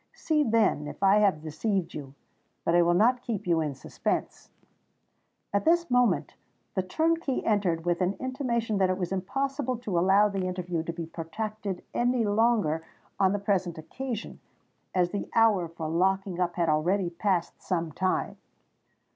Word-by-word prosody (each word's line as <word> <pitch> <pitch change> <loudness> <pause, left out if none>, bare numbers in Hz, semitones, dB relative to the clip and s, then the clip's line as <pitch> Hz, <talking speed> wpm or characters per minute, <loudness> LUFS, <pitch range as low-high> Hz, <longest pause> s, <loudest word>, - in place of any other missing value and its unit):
See, 310 -2 +1
then, 220 - +2
if 150 - -7
I 195 +1 +6
have 195 -7 +2
deceived 175 +4 -2
you:—but 140 +3 -7
I 175 - +6
will 175 0 +3
not 240 +6 +4
keep 230 -6 -4
you 170 -2 +2
in 150 -3 -2
suspense——" 130 - -3 1.0
At 200 - +2
this 340 -2 +2
moment, 245 -1 +2 0.4
the 190 - +1
turnkey 315 - 0
entered 185 -6 +1
with 175 +1 0
an 185 +2 +1
intimation 240 -5 -1
that 190 -1 +3
it 185 - 0
was 180 -2 -3
impossible 260 +7 -2
to 205 -7 -1
allow 195 +4 +5
the 195 -2 -2
interview 180 -2 -2
to 170 - -2
be 165 0 -5
protracted 190 +4 -5
any 245 -1 +1
longer 205 -7 +2 0.4
on 190 -1 +4
the 205 - 0
present 195 -4 -1
occasion, 230 +8 -6 0.6
as 180 -1 +2
the 205 - -4
hour 215 -6 +4
for 165 -1 -6
locking 190 +2 0
up 175 -1 0
had 170 -2 +1
already 170 +4 +1
passed 175 -1 -1
some 170 -3 -2
time. 185 +4 -1
190 Hz, 160 wpm, -28 LUFS, 170-225 Hz, 1.0 s, I